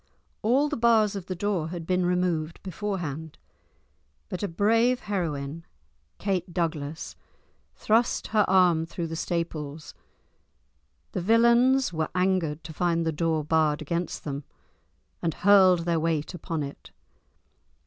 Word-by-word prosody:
All 260 Hz, +7 st, +3 dB
the 300 Hz, -, -2 dB
bars 225 Hz, -3 st, +3 dB
of 190 Hz, -2 st, -6 dB
the 185 Hz, -, -3 dB
door 185 Hz, -3 st, -1 dB
had 170 Hz, -1 st, -6 dB
been 180 Hz, 0 st, +1 dB
removed 175 Hz, -3 st, -1 dB
beforehand, 175 Hz, -6 st, -4 dB, 0.9 s
but 185 Hz, -, -4 dB
a 205 Hz, -, 0 dB
brave 230 Hz, +8 st, +2 dB
heroine, 165 Hz, -6 st, -3 dB, 0.5 s
Kate 185 Hz, -3 st, -2 dB
Douglas, 160 Hz, -3 st, -3 dB, 0.6 s
thrust 230 Hz, +3 st, +1 dB
her 215 Hz, -1 st, +3 dB
arm 180 Hz, -4 st, +4 dB
through 170 Hz, 0 st, -4 dB
the 165 Hz, 0 st, -5 dB
staples. 160 Hz, -3 st, -4 dB, 1.2 s
The -, -, -3 dB
villains 235 Hz, +3 st, +4 dB
were 160 Hz, -1 st, -1 dB
angered 180 Hz, -5 st, 0 dB
to 160 Hz, +2 st, -8 dB
find 170 Hz, 0 st, 0 dB
the 160 Hz, -, +1 dB
door 160 Hz, 0 st, 0 dB
barred 155 Hz, -1 st, +2 dB
against 170 Hz, +3 st, -3 dB
them, 140 Hz, -1 st, -4 dB, 0.8 s
and 165 Hz, -2 st, -1 dB
hurled 190 Hz, -3 st, +5 dB
their 170 Hz, -1 st, +1 dB
weight 160 Hz, -1 st, -1 dB
upon 165 Hz, -2 st, -4 dB
it. 140 Hz, 0 st, -9 dB
175 Hz, 130 wpm, -26 LUFS, 160-200 Hz, 1.2 s, hurled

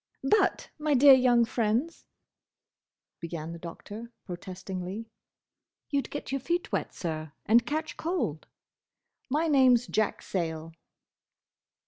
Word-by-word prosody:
"But, 385 Hz, +8 st, +2 dB
my 300 Hz, -1 st, +2 dB
dear 275 Hz, +2 st, +9 dB
young 245 Hz, -2 st, +5 dB
friends—" 230 Hz, +7 st, -1 dB, 1.1 s
began 165 Hz, -1 st, -5 dB
the 170 Hz, -, -8 dB
Doctor, 210 Hz, +7 st, -9 dB
protestingly. 185 Hz, +3 st, -6 dB, 0.8 s
"You'd 280 Hz, -1 st, 0 dB
get 290 Hz, -, -6 dB
your 275 Hz, -1 st, -1 dB
feet 345 Hz, +6 st, -1 dB
wet, -, -, -1 dB
Sir, 155 Hz, -3 st, -5 dB
and 235 Hz, +2 st, +4 dB
catch 310 Hz, +2 st, -3 dB
cold. 320 Hz, -, -2 dB, 0.8 s
My 305 Hz, +5 st, +1 dB
name's 260 Hz, -5 st, +5 dB
Jack 215 Hz, -3 st, -1 dB
Sayle." 165 Hz, -3 st, -3 dB
230 Hz, 110 wpm, -28 LUFS, 175-280 Hz, 1.1 s, dear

